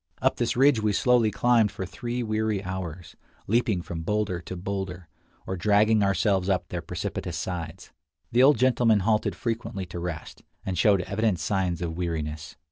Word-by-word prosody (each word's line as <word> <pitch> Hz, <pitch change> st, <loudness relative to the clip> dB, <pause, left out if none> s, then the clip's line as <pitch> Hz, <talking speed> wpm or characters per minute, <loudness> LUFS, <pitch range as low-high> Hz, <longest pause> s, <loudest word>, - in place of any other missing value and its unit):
Up -, -, +1 dB
this 120 Hz, 0 st, 0 dB
ridge 135 Hz, -3 st, +5 dB
we 105 Hz, -1 st, +1 dB
slowly 120 Hz, +1 st, +3 dB
climbed 115 Hz, 0 st, +3 dB
for 95 Hz, -, -5 dB
three 120 Hz, +5 st, -4 dB
weary 110 Hz, -2 st, -1 dB
hours, 95 Hz, -2 st, -6 dB, 0.3 s
leaping 110 Hz, -4 st, +1 dB
from 85 Hz, -1 st, -5 dB
boulder 100 Hz, -1 st, -1 dB
to 95 Hz, -, -7 dB
boulder, 95 Hz, -2 st, -4 dB, 0.4 s
or 95 Hz, -, -3 dB
dragging 105 Hz, +3 st, +3 dB
ourselves 100 Hz, -1 st, +1 dB
up 95 Hz, -2 st, 0 dB
their -, -, -3 dB
precipitous -, -, -4 dB
sides. 85 Hz, -3 st, -5 dB, 0.4 s
The 120 Hz, -, +4 dB
old 140 Hz, +1 st, +6 dB
gentleman 120 Hz, -4 st, +3 dB
halted 110 Hz, +2 st, +1 dB
frequently 115 Hz, -5 st, -3 dB
to 85 Hz, 0 st, -7 dB
rest, 85 Hz, -2 st, -6 dB, 0.2 s
and 95 Hz, -, -2 dB
showed 100 Hz, +1 st, +4 dB
evident 100 Hz, 0 st, 0 dB
signs 90 Hz, -1 st, -1 dB
of 80 Hz, -1 st, -3 dB
weariness. 80 Hz, -3 st, -4 dB
100 Hz, 165 wpm, -26 LUFS, 90-110 Hz, 0.4 s, old